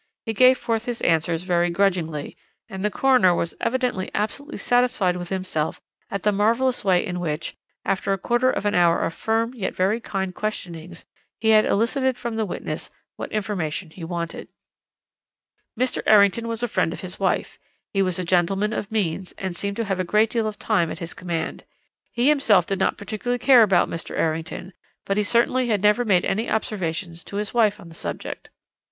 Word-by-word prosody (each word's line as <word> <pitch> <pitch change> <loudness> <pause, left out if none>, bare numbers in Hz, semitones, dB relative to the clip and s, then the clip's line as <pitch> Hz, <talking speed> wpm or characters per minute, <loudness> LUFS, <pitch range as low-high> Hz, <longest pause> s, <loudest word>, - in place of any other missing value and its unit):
He 225 - -2
gave 255 +3 +6
forth 225 0 -2
his 240 -1 -3
answers 165 0 +1
very 175 -1 +1
grudgingly, 170 -5 0 0.3
and 190 -4 -6
the 210 - +2
coroner 210 -7 +4
was 170 - -2
evidently 250 -6 -1
absolutely 280 +9 -3
satisfied 245 -7 +2
with 175 -1 -6
himself 185 -5 -2 0.3
at 200 -2 -4
the 210 - +3
marvellous 230 +5 +1
way 185 -3 +3
in 180 -1 -3
which, 155 -2 -3 0.3
after 195 +1 0
a 195 - +1
quarter 240 +6 +1
of 210 - -2
an 205 - +2
hour 170 -1 +4
of 165 - -1
firm 225 +6 0
yet 230 -7 -4
very 195 +5 +1
kind 190 -4 -3
questionings, 175 -5 -5 0.3
he 220 - +1
had 215 -1 +6
elicited 255 +4 +1
from 235 -2 -4
the 220 -2 -1
witness - - -5 0.3
what - - -6
information 185 -6 -3
he 170 - -10
wanted. 170 0 -4 1.3
"Mr. 255 0 +1
Errington 210 +2 +5
was 230 +1 -2
a - - +2
friend 185 -7 0
of - - -7
his 185 -1 -7
wife. 190 -2 -1 0.3
He 195 - +2
was 185 -3 +1
a 185 - -2
gentleman 190 +4 +1
of 210 0 -4
means, 190 -4 -2
and 190 -2 -4
seemed 200 +3 -3
to 230 - -1
have 195 -2 -2
a - - +1
great 210 +4 +2
deal 225 -2 0
of 215 - -5
time 185 -7 +1
at - - -5
his 170 0 -7
command. 170 -3 -4 0.5
He 240 +2 +1
himself 235 - +4
did 195 +1 -2
not - - +1
particularly 220 +4 -3
care 255 -1 +6
about 195 -5 +4
Mr. 165 - -5
Errington, 165 +3 -2 0.3
but 195 - -1
he - - +4
certainly 240 +4 +2
had 210 -4 0
never 210 +4 +4
made 190 -6 +3
any 220 +4 -1
observations 175 -5 -3
to - - -8
his 205 0 -3
wife 220 -4 +3
on - - -12
the - - -13
subject. - - -6
200 Hz, 195 wpm, -23 LUFS, 175-225 Hz, 1.3 s, gave